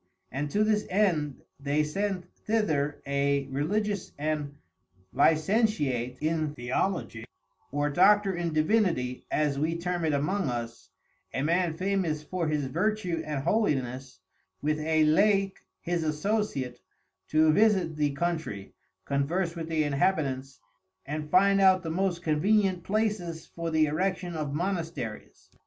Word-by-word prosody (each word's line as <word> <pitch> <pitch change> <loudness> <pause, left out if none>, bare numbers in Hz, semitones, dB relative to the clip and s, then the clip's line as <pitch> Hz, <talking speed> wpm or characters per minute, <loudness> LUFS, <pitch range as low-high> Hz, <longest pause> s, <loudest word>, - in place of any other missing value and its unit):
And 145 +3 -2
to 210 +7 +2
this 215 -1 +1
end 170 -8 +1 0.2
they 145 +2 +1
sent 190 +3 -2
thither 155 -10 -1
a 140 0 +1
Religious 200 +8 -1
and 150 -1 -2 0.6
Licentiate 155 - +2
in 155 -1 -1
Theologie, 120 -2 -2 0.5
(or 145 +1 0
Doctor 195 +3 +4
in 175 -1 -2
Divinity, 155 - +1
as 145 -2 0
we 160 +3 0
term 175 0 -2
it 155 -2 +1
among 150 +4 0
us) 120 -1 -5 0.5
a 135 - 0
Man 170 +1 +1
Famous 185 -5 -1
for 175 +1 -2
his 150 -2 0
Vertue 180 +3 -1
and 150 -3 -3
Holiness 130 - -1 0.4
with 150 +1 0
a 155 0 +2
Laic 195 +5 +3 0.2
his 175 -1 -1
Associate, 155 - -1 0.5
to 155 0 +4
visit 195 -6 +3
the 150 -1 +1
Country, 160 - -3 0.3
converse 165 +6 -1
with 165 -1 -5
the 160 -1 +1
Inhabitants, 140 -3 0 0.5
and 150 +2 -4
find 195 +3 +4
out 190 -1 +5
the 160 - -3
most 175 0 -1
convenient 185 +3 +2
places 195 -6 -1
for 170 0 -5
the 160 -1 +3
Erection 180 +3 -1
of 150 -3 -3
Monasteries. 165 - -4
160 Hz, 130 wpm, -28 LUFS, 145-190 Hz, 0.6 s, out